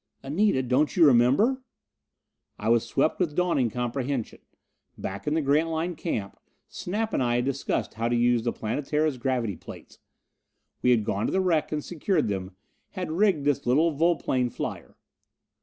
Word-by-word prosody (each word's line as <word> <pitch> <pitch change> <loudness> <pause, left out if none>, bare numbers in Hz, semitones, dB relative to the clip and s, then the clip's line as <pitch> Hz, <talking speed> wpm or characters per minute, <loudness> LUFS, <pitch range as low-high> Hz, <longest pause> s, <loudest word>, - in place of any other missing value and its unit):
"Anita! 150 0 +1
Don't 130 +4 +1
you 170 - +7
remember!" 140 - +4 1.0
I 105 - -2
was 115 -1 +4
swept 140 +3 +1
with 165 -5 0
dawning 170 -9 +1
comprehension. 125 +1 -3 0.6
Back 95 +5 -6
in 150 - +1
the 160 - +1
Grantline 160 +4 +1
camp 110 - -4 0.3
Snap 215 +5 -3
and - - +1
I 120 -1 +1
had 120 +1 +1
discussed 135 0 -2
how 115 +1 -2
to 120 - +1
use 120 0 +3
the 120 +1 -1
Planetara's 145 +4 -1
gravity 120 -6 -1
plates. - - -12 0.8
We 125 - +2
had 115 -4 +3
gone 100 +1 -1
to - - -2
the 190 - +1
wreck 175 -5 +1
and 150 -1 -3
secured 170 - 0
them, 95 -1 -4 0.4
had 180 -5 -4
rigged 175 -4 +2
this 145 -2 0
little 155 +7 +3
volplane 150 -5 +1
flyer.... - - -6
140 Hz, 160 wpm, -26 LUFS, 120-165 Hz, 1.0 s, you